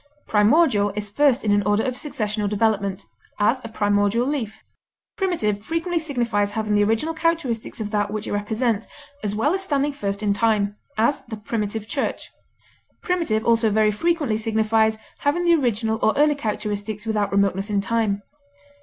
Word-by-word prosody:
Primordial 210 -1 +3
is 210 -1 -4
first 275 +2 +3
in 210 - +1
an 205 0 +4
order 205 +2 +1
of 255 -1 -2
succession 220 -7 -2
or 205 - 0
development; 205 -2 0 0.3
as, 225 +5 +2
a - - -5
primordial 205 +2 +1
leaf. 255 -7 -3 0.5
Primitive 330 - 0
frequently 330 +4 -1
signifies 235 -9 -1
having 215 -1 -1
the 205 0 +4
original 225 +10 0
characteristics 320 -11 -1
of 210 -1 -4
that 205 -1 0
which 215 0 -4
it - - -5
represents, 220 +2 -1 0.4
as 205 -1 -2
well 280 +10 +1
as 385 - -1
standing 290 -5 0
first 200 -6 -3
in 205 -1 +2
time; 205 -1 +1 0.2
as, 235 +6 +2
the 220 -1 -6
primitive 210 0 -3
church. - - -3 0.7
Primitive 335 - 0
also 230 -1 +3
very 215 0 +3
frequently 295 -1 0
signifies 220 0 +2 0.2
having 320 +5 0
the 340 - +5
original 225 -6 +1
or 220 - +3
early 295 +1 +4
characteristics 210 -4 -4
without 210 -2 0
remoteness 200 0 +1
in 205 -1 +1
time. 205 -1 0
220 Hz, 165 wpm, -23 LUFS, 205-270 Hz, 0.7 s, the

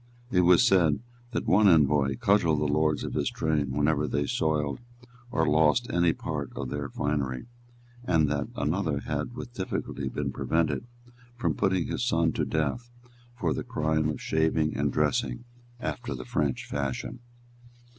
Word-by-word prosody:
It 90 - +4
was 90 0 +6
said 85 -6 +4 0.3
that 120 - -3
one 105 +2 +5
envoy 75 -5 +4
cudgelled 100 -9 +3
the 75 - 0
lords 75 +1 +1
of - - -4
his - - 0
train 75 -3 0
whenever 75 +2 +1
they 70 - 0
soiled 75 -1 0 0.5
or 125 - +1
lost 80 +10 +3
any 85 -1 +4
part - - -4
of 65 - -4
their 70 -1 -3
finery, 70 - -2 0.6
and 80 -8 +3
that 70 0 -1
another 75 -1 -1
had 120 - -3
with 120 -1 -7
difficulty 95 -4 -3
been - - -3
prevented 85 +8 0 0.5
from 120 - 0
putting 95 -3 +1
his - - -2
son 85 -9 +2
to - - -1
death 80 - -1 0.5
for 120 - 0
the - - -3
crime 80 0 0
of 75 - -3
shaving 80 -1 +1
and 70 +1 0
dressing 60 - 0 0.4
after 125 0 -4
the - - -7
French 75 - -1
fashion. 70 - -3
80 Hz, 155 wpm, -28 LUFS, 75-90 Hz, 0.6 s, was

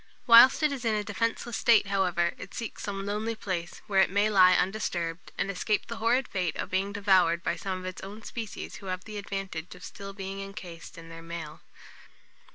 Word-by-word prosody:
Whilst 245 +5 +8
it 300 - +4
is 270 -3 -4
in 225 -2 +1
a 210 - -1
defenceless 230 +2 -2
state, 230 -3 +5
however, 180 -3 +1
it 185 - -9
seeks 230 -3 -5
some 195 -1 -4
lonely 215 +3 -2
place, 180 -5 -5
where 195 -3 +3
it - - +3
may 205 +3 +2
lie 185 -2 +7
undisturbed, 175 -4 -2
and 200 - -1
escape 210 +3 0
the 235 - -6
horrid 240 +3 +2
fate 180 -4 -2
of - - -4
being 195 +2 0
devoured 185 -4 +3
by 170 - 0
some 185 +1 -4
of 185 - -8
its 185 0 -6
own 205 +3 -9
species 225 -3 -6
who 195 - -11
have 185 0 -3
the 215 -2 -6
advantage 195 -4 -5
of 180 - -14
still 195 +4 -8
being 195 0 -6
encased 185 -5 -9
in 165 0 -11
their 165 0 -9
mail. 165 -2 -7
195 Hz, 205 wpm, -28 LUFS, 180-215 Hz, -, Whilst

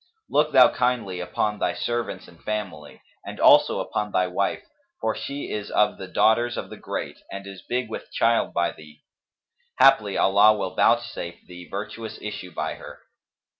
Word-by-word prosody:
Look 150 +1 +3
thou 130 -2 +7
kindly 120 -7 -1
upon 105 +3 -2
thy - - 0
servants 120 0 -3
and 85 - -18
family, 95 -9 -5 0.2
and - - -8
also - - +6
upon 105 0 -3
thy 95 - +2
wife, 95 +2 -1 0.4
for - - -1
she 140 +1 -5
is 105 -1 -4
of 105 - +2
the 95 - -7
daughters 120 +5 +2
of - - -6
the - - -8
great - - -5
and 100 0 -7
is 100 -1 -10
big 125 0 -2
with 110 - -8
child 115 0 +2
by 85 0 0
thee; 75 -1 -16 0.7
haply 130 -7 +5
Allah 105 +2 +5
will 95 -2 -3
vouchsafe 115 -7 0
thee 90 -1 -11
virtuous 110 +2 -6
issue 100 -3 -6
by - - -3
her." - - -11
105 Hz, 170 wpm, -24 LUFS, 95-120 Hz, 0.7 s, thou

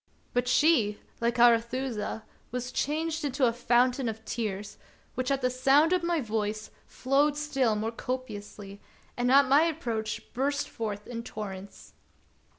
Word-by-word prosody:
But 245 0 +1
she, 250 -6 +3 0.2
like 235 +1 0
Arethusa, 235 -1 +2 0.3
was 250 +1 -4
changed 320 +4 -1
into 270 -2 +1
a 230 - +2
fountain 245 +1 +2
of 220 0 -7
tears, 210 -3 -4 0.3
which 255 +1 -2
at 275 -1 0
the 250 - +2
sound 275 +6 +4
of 365 - +2
my 340 -1 0
voice 215 -3 -3 0.2
flowed 285 +3 +1
still 275 -7 +1
more 220 +2 -2
copiously, 210 -5 -6 0.3
and 245 +1 +1
at 280 +1 +7
my 280 +3 +6
approach 230 -10 -3
burst 280 +3 -1
forth 210 -3 -5
in 230 -1 -5
torrents. 200 -4 -8
245 Hz, 145 wpm, -28 LUFS, 220-275 Hz, 0.3 s, at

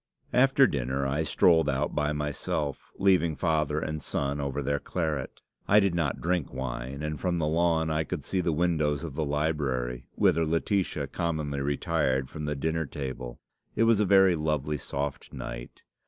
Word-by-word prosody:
"After 135 +2 +5
dinner 70 - -1
I 70 +3 0
strolled 80 0 +4
out 70 +3 -1
by 75 0 0
myself, 75 -1 -3
leaving 90 -5 +3
father 75 -3 +1
and 75 0 -3
son 70 0 -2
over 70 +1 -2
their 70 +1 0
claret. 80 -6 -3 0.3
I 105 - +6
did 100 -3 +2
not 85 -5 -1
drink 90 -3 -1
wine; 65 +2 -5
and 75 -1 -3
from 90 -2 0
the 80 - 0
lawn 80 0 +2
I 80 0 +1
could - - -5
see 95 - 0
the 85 - 0
windows 80 -2 +1
of 80 -4 -5
the 80 - -1
library, 70 -5 -1
whither 90 -5 +3
Laetitia 80 -1 0
commonly 75 -1 -2
retired 70 -2 0
from 75 -1 -5
the 75 0 -1
dinner 80 +2 -1
table. 65 -3 -6 0.4
It - - +3
was 115 -2 +4
a 105 - +3
very 95 -1 +6
lovely 75 -2 -1
soft 70 0 -4
night. - - -7
75 Hz, 170 wpm, -28 LUFS, 70-85 Hz, 0.4 s, I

